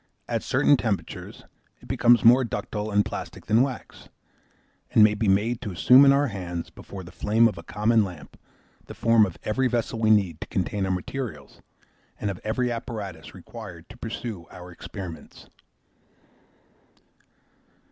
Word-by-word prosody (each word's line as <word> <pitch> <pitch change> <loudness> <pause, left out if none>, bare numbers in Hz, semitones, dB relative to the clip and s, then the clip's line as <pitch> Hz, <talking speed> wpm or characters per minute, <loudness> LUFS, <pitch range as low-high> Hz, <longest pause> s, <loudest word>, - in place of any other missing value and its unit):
At - - -1
certain - - +3
temperatures - - -4 0.4
it - - -16
becomes 120 -1 +4
more 125 +3 +7
ductile 110 -2 -4
and 105 0 +2
plastic - - -7
than 110 +3 +3
wax, 130 -2 -4 0.8
and 110 - +5
may 105 0 +5
be 105 +1 -1
made 105 +5 +1
to 115 - -5
assume 125 +10 +6
in 135 - +7
our 140 +1 +3
hands, 90 -7 -5
before 95 -2 -10
the 85 - -12
flame 110 +6 +3
of 110 - -3
a 85 - -8
common 105 +5 +2
lamp, 90 -6 -9 0.5
the - - -9
form 115 -2 +4
of 90 - -10
every 130 +5 +1
vessel 120 -1 -2
we 110 -1 +2
need 95 -7 +2
to - - -5
contain 95 +1 -2
our - - 0
materials, 90 - -5 0.6
and 105 - -1
of 95 - -9
every 120 +3 -1
apparatus 100 - -6
required 85 0 -10
to 110 - -12
pursue 115 -6 -6
our 90 0 -11
experiments. 90 -1 -9
105 Hz, 155 wpm, -25 LUFS, 95-115 Hz, 0.8 s, more